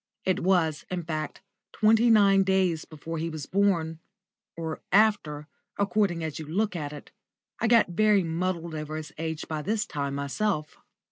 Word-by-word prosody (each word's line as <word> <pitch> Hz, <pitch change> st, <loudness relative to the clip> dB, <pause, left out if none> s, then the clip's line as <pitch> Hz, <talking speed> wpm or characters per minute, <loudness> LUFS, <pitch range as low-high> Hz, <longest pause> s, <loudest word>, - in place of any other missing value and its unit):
It 185 Hz, -, +1 dB
was, 170 Hz, -5 st, +1 dB
in 180 Hz, -1 st, -3 dB
fact, 155 Hz, +1 st, -4 dB, 0.3 s
twenty 225 Hz, +2 st, +4 dB
nine 200 Hz, -3 st, +6 dB
days 190 Hz, -4 st, +1 dB
before 160 Hz, +1 st, -6 dB
he 165 Hz, +1 st, -2 dB
was 155 Hz, -3 st, -6 dB
born, 170 Hz, -5 st, +1 dB, 0.6 s
or 160 Hz, -1 st, -4 dB
after, 195 Hz, -8 st, +3 dB, 0.3 s
according 200 Hz, -4 st, +1 dB
as 160 Hz, -1 st, -4 dB
you 155 Hz, -, -7 dB
look 200 Hz, +5 st, -1 dB
at 150 Hz, -4 st, -4 dB
it. 150 Hz, -, -10 dB, 0.5 s
I -, -, +1 dB
got 230 Hz, -4 st, +5 dB
very 205 Hz, +2 st, +3 dB
muddled 170 Hz, 0 st, -2 dB
over 155 Hz, 0 st, -5 dB
his 155 Hz, -1 st, -6 dB
age 160 Hz, -1 st, -3 dB
about 155 Hz, -2 st, -5 dB
this 215 Hz, +1 st, 0 dB
time 140 Hz, -1 st, -3 dB
myself. 150 Hz, +3 st, -2 dB
170 Hz, 160 wpm, -27 LUFS, 155-200 Hz, 0.6 s, nine